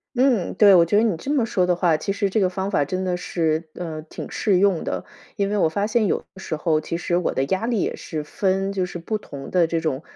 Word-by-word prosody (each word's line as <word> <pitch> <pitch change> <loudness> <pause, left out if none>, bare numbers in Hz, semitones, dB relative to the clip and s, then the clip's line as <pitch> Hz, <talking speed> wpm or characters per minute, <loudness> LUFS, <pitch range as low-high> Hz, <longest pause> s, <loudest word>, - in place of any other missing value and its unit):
嗯， 250 -6 +2
对， 200 0 +7
我 170 -2 +7
觉 205 - +1
得 215 - +5
你 220 -7 +1
这 270 - -5
么 275 -6 +2
说 185 -5 +1
的 180 -1 +2
话， 170 -3 +3
其 195 - -2
实 200 -1 0
这 215 - +1
个 185 - +3
方 190 +2 -3
法 145 - +2
真 185 +4 -2
的 180 -1 0
是， 160 -2 -1
呃， 160 -3 -5
挺 155 - -8
适 195 -4 +1
用 195 -4 +3
的。 - - -3 0.3
因 200 0 0
为 210 - 0
我 165 - +3
发 200 +6 -1
现 220 -1 +1
有 - - +1 0.2
的 190 - -12
时 160 -4 -3
候 155 0 +1
其 165 +2 -4
实 175 0 -1
我 180 - -1
的 135 - +1
压 190 +9 -1
力 230 -5 0
也 - - -1
是 155 -2 -5
分 195 +3 -1
就 185 -2 -1
是 175 - -7
不 215 +6 -3
同 140 -9 -9
的 180 -2 +3
这 165 0 -1
种， 155 -3 -2
185 Hz, 295 characters per minute, -23 LUFS, 165-200 Hz, 0.3 s, 对